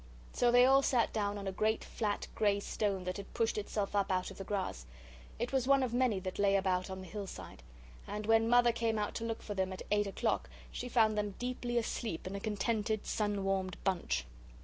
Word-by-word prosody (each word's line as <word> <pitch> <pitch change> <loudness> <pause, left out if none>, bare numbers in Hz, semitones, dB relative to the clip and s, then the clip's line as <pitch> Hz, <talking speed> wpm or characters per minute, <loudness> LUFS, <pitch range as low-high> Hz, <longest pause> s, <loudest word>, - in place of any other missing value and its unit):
So 240 -1 +3
they 245 +1 +7
all 270 +1 +6
sat 245 -4 +2
down 205 -1 -1
on 200 -1 -5
a - - 0
great 215 +3 0
flat 210 -3 -2
grey 205 -2 +2
stone 200 -2 -1
that 180 0 -3
had 200 - -8
pushed 225 -1 +1
itself 205 -1 -2
up 200 -1 +2
out 185 +1 0
of 195 - -12
the - - -4
grass; 185 - -3 0.5
it 240 +2 -2
was 260 -2 +1
one 275 -1 +5
of 245 -2 -2
many 245 -5 +2
that 185 +1 -5
lay 200 -1 +4
about 190 -1 +1
on 190 0 -5
the 185 - -9
hillside, 185 - -7 0.5
and 210 +1 -4
when 225 +1 +4
Mother 240 0 +6
came 230 -1 0
out 210 -1 -1
to - - -4
look 225 -1 -3
for 205 - -4
them 190 -1 -1
at 185 - -6
eight 205 0 +3
o'clock, 195 - -1 0.2
she 250 - -5
found 220 -3 +4
them 205 -2 -2
deeply 245 -1 -2
asleep 225 -5 -2
in 185 - -4
a 200 - -3
contented, 215 +1 -1
sun 205 -2 -1
warmed 190 -1 -1
bunch. 170 - 0
205 Hz, 220 wpm, -33 LUFS, 195-230 Hz, 0.5 s, they